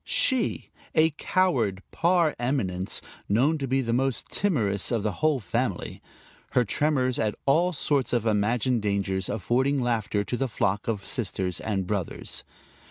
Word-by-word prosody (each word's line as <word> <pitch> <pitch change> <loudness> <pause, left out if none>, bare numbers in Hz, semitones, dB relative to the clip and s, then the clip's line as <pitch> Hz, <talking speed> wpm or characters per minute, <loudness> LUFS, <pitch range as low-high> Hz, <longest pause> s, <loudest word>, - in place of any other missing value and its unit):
She, 260 -4 +1 0.2
a 160 0 +5
coward 120 - +1
par 170 -3 +2
eminence, 100 -8 -1 0.3
known 135 +10 +3
to 135 - -2
be 135 +1 +1
the 115 -2 -1
most 130 +1 0
timorous 110 - +1
of 115 -4 0
the 105 - 0
whole 155 -3 +3
family; 90 -6 -2 0.5
her 125 - +3
tremors 130 +1 +1
at 105 -1 0
all 170 +6 +3
sorts 140 -4 0
of 120 -2 0
imagined 115 +3 +1
dangers 100 -2 -1
affording 130 +7 +1
laughter 110 -4 0
to 125 - -3
the 135 - 0
flock 100 -3 -1
of 105 -4 -2
sisters 95 -5 -2
and 100 -4 -2
brothers. 95 -3 -3
120 Hz, 150 wpm, -26 LUFS, 100-140 Hz, 0.5 s, a